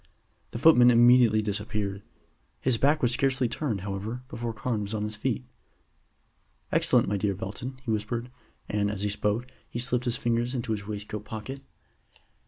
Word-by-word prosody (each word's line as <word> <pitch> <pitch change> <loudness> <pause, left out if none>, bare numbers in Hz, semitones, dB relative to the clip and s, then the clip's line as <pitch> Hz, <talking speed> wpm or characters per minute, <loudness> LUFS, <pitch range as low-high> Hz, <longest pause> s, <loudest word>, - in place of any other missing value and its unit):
The - - -6
footman 125 -3 +7
immediately 120 -2 +6
disappeared. 105 -1 -2 0.6
His 125 -3 +1
back 145 +2 +3
was 120 - +4
scarcely 130 0 +1
turned, 115 - -2
however, 105 +5 -4
before 115 -2 -4
Carne 110 0 -2
was 100 +2 -3
on 105 - -2
his 105 0 -4
feet. - - -2 1.3
"Excellent, - - +3
my 100 +1 0
dear 100 0 0
Belton," 125 +5 -6
he 120 - -2
whispered; 115 +3 -2 0.4
and, 105 -1 0
as 100 -1 -3
he 105 - +1
spoke, 105 +3 -1 0.2
he - - -5
slipped 125 +1 0
his 120 -1 +1
fingers 120 +2 0
into 120 -2 -2
his 100 -2 -3
waistcoat 105 0 -5
pocket. 110 +6 -6
115 Hz, 165 wpm, -27 LUFS, 105-125 Hz, 1.3 s, footman